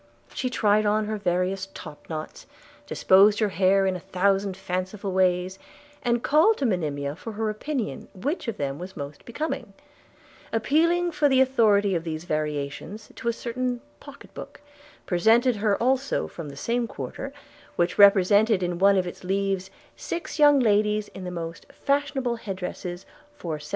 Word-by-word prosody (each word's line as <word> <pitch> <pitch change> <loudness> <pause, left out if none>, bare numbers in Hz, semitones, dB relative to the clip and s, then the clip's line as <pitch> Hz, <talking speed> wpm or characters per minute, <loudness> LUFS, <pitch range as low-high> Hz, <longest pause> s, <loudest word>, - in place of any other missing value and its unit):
She 255 - -2
tried 215 -3 +2
on 210 +1 +1
her 215 0 -3
various 185 0 -1
topknots, 155 +1 -8 0.4
disposed 200 +2 +5
her 215 -1 +1
hair 195 +1 +3
in 190 -1 +1
a - - -4
thousand 195 +1 0
fanciful 190 +1 -4
ways, 185 0 +1 0.4
and 240 -1 0
called 320 +10 +4
to 275 - -1
Monimia 150 - -1
for 225 +6 -8
her 215 0 -1
opinion, 245 +2 -4
which 275 - -3
of 230 - -3
them 140 0 -3
was 185 +2 -8
most 140 +1 -7
becoming; 305 +7 -4 0.8
appealing 335 +9 +2
for 295 -2 +2
the 265 -1 +4
authority 215 -7 +3
of 165 -2 -1
these 160 -1 -4
variations 155 +6 -4
to - - -6
a - - +4
certain 245 +1 -3 0.2
pocket - - -14
book, - - -9 0.5
presented 225 +6 +3
her 205 -1 +1
also 265 +3 0
from 160 -4 -8
the 140 - -11
same 235 +8 -1
quarter, 205 - -6 0.4
which 175 +2 0
represented 200 +1 +5
in 175 -1 -2
one 200 +1 +5
of 185 - +1
its 175 - -8
leaves 195 0 -1 0.3
'six 340 -2 -5
young 290 -1 +7
ladies 210 -2 +2
in 190 - -9
the - - -3
most 165 -1 -6
fashionable 275 -4 -1
head 200 -4 -5
dresses 180 0 -6 0.3
for 160 -3 -4
1776.' 150 - -11
200 Hz, 160 wpm, -25 LUFS, 180-235 Hz, 0.8 s, young